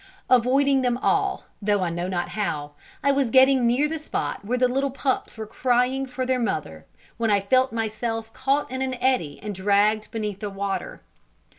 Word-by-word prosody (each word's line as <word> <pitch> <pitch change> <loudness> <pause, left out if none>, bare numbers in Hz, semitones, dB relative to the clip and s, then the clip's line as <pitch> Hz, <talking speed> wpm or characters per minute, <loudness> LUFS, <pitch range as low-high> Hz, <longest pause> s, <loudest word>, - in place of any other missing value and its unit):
Avoiding 265 +2 +4
them 245 -1 +1
all, 395 +7 0 0.2
though 205 -1 +1
I 175 - -1
know 175 +1 -3
not 180 -2 -2
how, 150 -8 -3 0.3
I 280 - +4
was 275 -3 +1
getting 260 -1 +5
near 255 +5 +2
the 320 +1 -4
spot 300 - -4
where 240 +5 -1
the 250 0 +3
little 270 +3 0
pups 265 -2 -2
were 220 - -5
crying 250 +4 0
for 255 0 -3
their 255 0 +1
mother, 140 - -3 0.3
when 230 0 0
I 205 -1 +4
felt 255 +7 +2
myself 225 0 -3
caught 275 +1 0
in 260 0 -3
an 260 -1 -1
eddy 245 - 0
and 210 -1 -4
dragged 205 +3 +2
beneath 210 -3 -4
the 210 - -4
water. 200 - -4
240 Hz, 185 wpm, -24 LUFS, 205-260 Hz, 0.3 s, getting